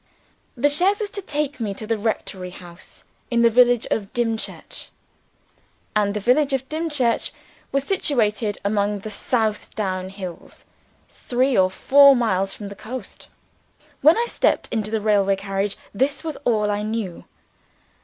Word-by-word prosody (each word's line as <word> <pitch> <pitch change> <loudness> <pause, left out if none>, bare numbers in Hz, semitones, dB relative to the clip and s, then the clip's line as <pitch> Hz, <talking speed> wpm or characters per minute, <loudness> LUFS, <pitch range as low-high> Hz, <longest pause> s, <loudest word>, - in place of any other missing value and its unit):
The 270 +5 +3
chaise 360 +8 +3
was 420 -2 -3
to 400 - -6
take 295 -5 -3
me 210 -4 -2
to 215 - -7
the 225 +1 0
rectory 205 -4 -3
house 175 -1 -14 0.3
in 235 -1 +2
the 235 - +5
village 245 0 +4
of 200 -2 -1
Dimchurch. 230 -2 -3 1.1
And 205 -1 +2
the - - 0
village 270 +6 +2
of 265 0 -1
Dimchurch 295 -7 0 0.4
was 275 -1 +1
situated 230 - 0
among 205 0 0
the 215 - -7
South 220 0 -1
Down 185 -3 -2
Hills, 190 -3 -9 0.4
three 255 +1 0
or 185 -1 +4
four 280 +7 +6
miles 195 -5 +1
from 205 0 -8
the 200 - -9
coast. 245 +5 -8 0.7
When 310 +7 +6
I 470 - +2
stepped - - +1
into 215 -2 -1
the 220 -1 -1
railway 200 -2 +3
carriage, 195 +1 -2 0.2
this 270 +7 0
was 315 -2 -4
all 210 -3 +2
I 205 0 -1
knew. 215 -4 -4
220 Hz, 155 wpm, -22 LUFS, 200-265 Hz, 1.1 s, four